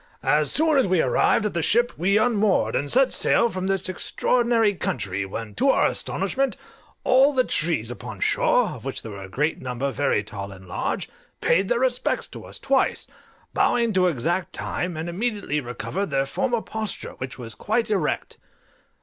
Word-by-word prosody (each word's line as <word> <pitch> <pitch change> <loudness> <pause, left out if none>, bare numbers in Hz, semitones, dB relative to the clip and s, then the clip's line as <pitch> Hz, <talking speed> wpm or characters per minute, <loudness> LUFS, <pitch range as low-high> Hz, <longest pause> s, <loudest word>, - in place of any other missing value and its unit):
As 150 -1 +2
soon 310 -2 +3
as 260 - +2
we 185 -2 +2
arrived 215 - +2
at 210 - -1
the 170 - -1
ship 240 +7 +3
we 195 +5 +2
unmoored, 215 - +2
and 145 - -1
set 265 0 +4
sail 235 - +4
from 185 -2 -4
this 195 -1 +1
extraordinary 230 +3 +1
country, 100 - -3
when, 105 +2 -6
to 275 - +1
our - - +4
astonishment, 270 -1 -1 0.5
all 270 +3 +5
the 255 - +4
trees 155 - 0
upon 120 -4 -8
shore, - - +2
of - - -9
which - - -4
there 110 - -7
were 100 -1 -8
a 95 - -9
great 150 +10 -1
number 130 +2 -3
very 120 - 0
tall 100 0 -7
and 95 -1 -13
large, - - -3 0.3
paid 190 +4 +2
their 240 0 +1
respects 255 -1 +1
to - - -10
us - - -8
twice, 275 -1 +1 0.5
bowing 235 -2 +2
to 185 -1 +3
exact 170 +4 -1
time, 180 -2 -3
and 160 +2 -4
immediately 200 -5 -2
recovered 160 +10 -4
their 135 -2 0
former 240 - -1
posture, 220 -3 -5
which 130 -1 -6
was 115 -3 -5
quite 220 +1 -1
erect. 205 - -1
185 Hz, 180 wpm, -24 LUFS, -, 0.5 s, all